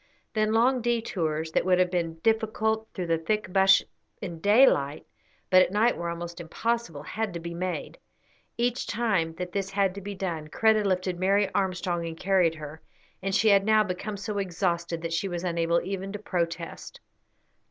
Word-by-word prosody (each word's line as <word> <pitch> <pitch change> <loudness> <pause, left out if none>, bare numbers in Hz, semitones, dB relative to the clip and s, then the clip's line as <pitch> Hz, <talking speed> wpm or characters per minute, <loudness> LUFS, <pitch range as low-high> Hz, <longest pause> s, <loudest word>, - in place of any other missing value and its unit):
Then 215 -1 +1
long 245 +3 +3
detours, 175 -10 -1
that - - +1
would 185 0 +3
have 180 -1 +2
been 170 -3 -1
difficult 220 0 +1
through 185 - -4
the 165 -1 +1
thick 200 +2 -2
bush 190 0 +6 0.4
in 170 -3 -6
daylight, 200 - +4 0.5
but 185 0 +8
at - - +3
night 220 +4 +3
were 170 0 -4
almost 170 +1 -6
impossible, 170 -3 -2
had 215 +1 -3
to - - -3
be 170 0 -6
made. 180 +1 -4 0.6
Each 245 +1 0
time 195 -8 0
that 180 0 -5
this 195 0 -2
had 195 -1 +1
to 200 - -8
be 200 +1 -6
done, 170 -5 -4
Kreta 220 +6 +3
lifted 185 -2 -1
Mary 195 +2 +2
Armstrong 180 -3 -1
and 165 0 -7
carried 180 -3 +2
her, 155 0 -9 0.4
and 195 0 -1
she 220 0 +4
had 200 -1 +5
now 215 +1 +4
become 200 +2 -4
so 205 +1 -3
exhausted 170 -3 -2
that 165 0 -3
she 180 +4 0
was 175 -2 -4
unable 170 -1 +1
even 195 +1 -4
to - - -3
protest. 170 -4 -4
185 Hz, 180 wpm, -27 LUFS, 170-210 Hz, 0.6 s, but